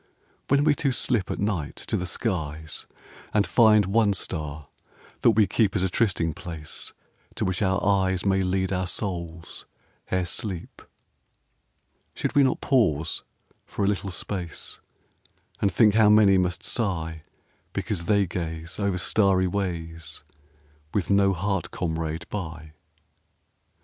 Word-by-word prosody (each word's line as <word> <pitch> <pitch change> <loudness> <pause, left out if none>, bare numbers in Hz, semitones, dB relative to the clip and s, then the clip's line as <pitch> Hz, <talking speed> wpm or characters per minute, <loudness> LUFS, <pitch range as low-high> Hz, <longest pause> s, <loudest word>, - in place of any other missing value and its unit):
When 140 +1 +3
we 150 -1 +5
two 140 -1 0
slip 120 -6 +1
at - - -2
night 95 -8 -2
to - - -3
the 90 - -2
skies 80 -6 -3 0.5
And 105 -1 +4
find 110 -3 +5
one 100 +1 +3
star 75 -5 -3 0.5
that - - +5
we 110 0 +5
keep 105 0 +1
As 95 - +1
a 95 - +1
trysting 90 -8 +1
place 80 -3 -6 0.4
to - - -1
which 95 +1 -1
our 95 -1 +2
eyes 95 -2 +2
May 95 -1 +3
lead 95 0 0
our 90 0 -1
souls 85 -5 -5 0.4
ere 95 -1 +1
sleep, 90 +1 -5 1.3
Should - - -2
we 145 - +5
not 130 -2 +2
pause 95 - +1 0.4
for 100 - -2
a - - +2
little 100 -1 -1
space 90 -1 -5 0.8
And 100 - +3
think 105 -3 +5
how 110 -1 +5
many 105 -2 +6
must 90 -2 -1
sigh 80 -8 -1 0.5
Because 95 -7 -3
they 100 0 +3
gaze 85 -1 -5
over 100 -2 0
starry 95 0 +3
ways 85 -4 -4 0.7
With 100 -2 0
no 100 -1 +5
heart 95 0 -1
comrade 80 -1 -3
by? 80 -5 -6
95 Hz, 140 wpm, -26 LUFS, 85-105 Hz, 1.3 s, many